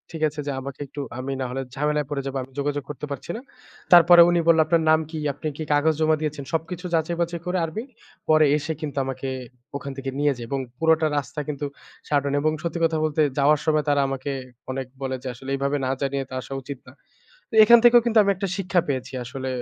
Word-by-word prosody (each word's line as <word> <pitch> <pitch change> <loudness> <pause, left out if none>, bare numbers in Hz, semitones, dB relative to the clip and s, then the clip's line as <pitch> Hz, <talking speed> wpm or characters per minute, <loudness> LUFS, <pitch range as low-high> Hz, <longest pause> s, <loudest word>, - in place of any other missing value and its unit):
ঠিক 155 - -3
আছে 150 0 -6
যে - - 0
আমাকে 135 0 -8
একটু 140 +2 -7 0.2
আমি 135 +2 -4
নাহলে 130 +1 -3
ঝামেলায় 150 +1 0
পড়ে 140 -2 -2
যাবো। 135 0 -3
আমি 135 - -14
যোগাযোগ 145 0 -1
করতে 150 0 -5
পারছি 140 +4 -6
না। - - -8 0.5
তারপরে 175 0 +9
উনি 175 0 +3
বলল 165 -1 +6
আপনার 165 +1 +2
নাম 155 - +6
কি? 160 - -5 0.2
আপনি 150 +3 -6
কি 160 - -3
কাগজ 155 +2 +3
জমা 155 0 +4
দিয়েছেন 150 -2 -3
সবকিছু 165 +3 -3
যাচাই-বাচাই 170 +1 -1
করে 185 +1 0
আর্মি, 165 +8 -5 0.5
পরে 155 -1 +6
এসে 155 +2 -3
কিন্তু 145 -2 -5
আমাকে 135 0 -4 0.5
ওখান 140 0 -7
থেকে 135 0 -4
নিয়ে 145 -1 +3
যায় 120 - -6
এবং 140 - -1 0.2
পুরোটা 160 -1 +3
রাস্তা 145 +2 -3
কিন্তু 145 -1 -3 0.4
সাটন 140 -1 +1
এবং 155 +1 +2
সত্যি 170 0 -2
কথা 160 -1 0
বলতে 155 0 +1 0.2
যাওয়ার 145 +1 +4
সময় 155 -1 +2
তারা 145 -1 +3
আমাকে 135 +1 -3 0.4
অনেক 130 -1 -4
বলে 130 -1 -2
যে - - -5
আসলে 130 +3 -10
এভাবে 140 +1 0
না - - -1
জানিয়ে 135 0 -1
তো - - -10
আসা 135 - -8
উচিত 140 +1 -7
না। - - -12 0.6
তো - - -9
এখান 235 +2 +8
থেকেও 240 0 +8
কিন্তু 225 -1 +3
আমি 200 - +2
একটা 195 +1 -3
শিক্ষা 185 -2 +1
পেয়েছি। 130 -1 -3
আসলে 130 +2 -5
150 Hz, 215 wpm, -24 LUFS, 135-160 Hz, 0.6 s, তারপরে